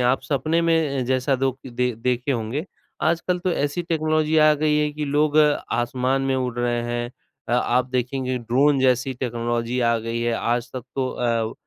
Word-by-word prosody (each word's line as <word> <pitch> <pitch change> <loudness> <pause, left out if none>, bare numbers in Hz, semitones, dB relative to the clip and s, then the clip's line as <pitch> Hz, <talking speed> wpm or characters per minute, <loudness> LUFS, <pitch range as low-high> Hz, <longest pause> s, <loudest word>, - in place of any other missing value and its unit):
आप 125 +2 +2
सपने 155 +5 0
में 160 -6 +1
जैसा 130 +2 +1
दोख 135 0 -1
दे 125 0 -1 0.2
देखे 125 +3 0
होंगे। 120 +6 -3 0.4
आजकल 170 +2 +1
तो 180 0 -1
ऐसी 145 +3 -1
टेक्नोलॉजी 155 -1 0
आ 155 0 +6
गई 150 0 +1
है 150 0 +1
कि 150 0 -4
लोग 150 +1 +1
आसमान 130 -3 +1
में 135 0 0
उड़ 125 -2 -2
रहे 120 -1 0
हैं 120 0 -3 0.4
अ, - - -1
आप 125 +1 +2
देखेंगे 130 0 -1
ड्रोन 135 +5 +2
जैसी 130 0 +2
टेक्नोलॉजी 120 0 -2
आ 115 -1 +3
गई 115 +1 -3
है, 120 0 0
आज 120 +1 -1
तक 130 -2 -5
तो 130 -1 0
अ, 115 -2 -1
130 Hz, 180 wpm, -23 LUFS, 120-150 Hz, 0.4 s, आ